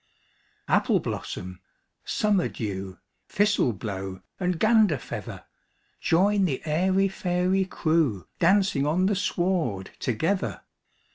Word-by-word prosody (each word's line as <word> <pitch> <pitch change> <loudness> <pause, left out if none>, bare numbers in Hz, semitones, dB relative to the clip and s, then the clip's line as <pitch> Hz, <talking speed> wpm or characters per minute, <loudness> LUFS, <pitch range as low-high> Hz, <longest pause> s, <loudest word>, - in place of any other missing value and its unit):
Appleblossom, 90 0 -1 0.4
Summerdew, 105 - -1 0.3
Thistleblow, 100 - 0 0.2
and 180 -3 -1
Ganderfeather! 215 - +1 0.6
Join 195 +4 +3
the 140 -7 -2
airy 185 +5 +2
fairy 185 0 0
crewDancing 165 - +1
on 175 +5 +2
the 205 +1 +2
sward 175 - -1
together! 165 - -1
175 Hz, 75 wpm, -26 LUFS, 120-195 Hz, 0.6 s, Join